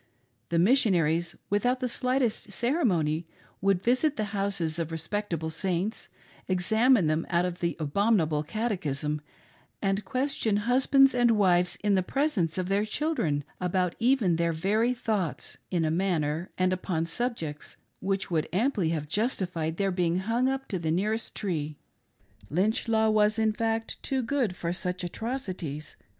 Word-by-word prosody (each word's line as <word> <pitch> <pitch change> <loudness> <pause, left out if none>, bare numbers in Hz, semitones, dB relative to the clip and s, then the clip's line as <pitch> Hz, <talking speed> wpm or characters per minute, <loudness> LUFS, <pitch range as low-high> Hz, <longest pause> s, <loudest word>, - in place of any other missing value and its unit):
The 170 - +1
Missionaries, 175 - +3 0.2
without 245 +5 +2
the 255 - -1
slightest 250 -3 0
ceremony, 175 - +1 0.3
would 195 -1 +2
visit 255 +5 +2
the 215 - 0
houses 195 -5 -1
of 165 -1 -3
respectable 165 -1 -3
Saints, 190 +5 -2 0.4
examine 220 +4 +3
them 155 +1 0
out 175 0 +2
of 180 -1 -4
the 170 -1 -1
abominable 160 -1 +2
catechism, 150 - -2 0.6
and 195 +1 0
question 255 -2 0
husbands 270 +2 +5
and 245 -1 +3
wives 180 -3 +3
in 205 -1 +3
the 190 - +3
presence 195 - 0
of 185 -1 -1
their 200 +2 +2
children 215 - -1 0.2
about 180 -1 0
even 230 -8 +3
their 170 0 +1
very 215 +9 +1
thoughts, 200 - -2
in 170 -3 +1
a 155 - +1
manner, 165 -2 0
and 185 0 +2
upon 180 -3 -1
subjects, 165 -6 -4 0.2
which 195 -1 -2
would 160 -2 0
amply 200 -3 +1
have 155 -2 -2
justified 175 - -1
their 195 -1 +1
being 175 -2 +1
hung 230 +7 +1
up 270 0 -3
to 190 - -2
the 160 -1 -2
nearest 210 +7 -1
tree 155 -7 -3 0.4
— - - -46 0.3
Lynch 205 - +1
law 220 -1 +3
was 215 0 +3
in 220 -1 +2
fact 225 0 -2
too 265 -2 -1
good 235 -6 0
for 170 -1 -2
such 180 0 -3
atrocities. 180 - -4
190 Hz, 150 wpm, -28 LUFS, 165-225 Hz, 0.6 s, husbands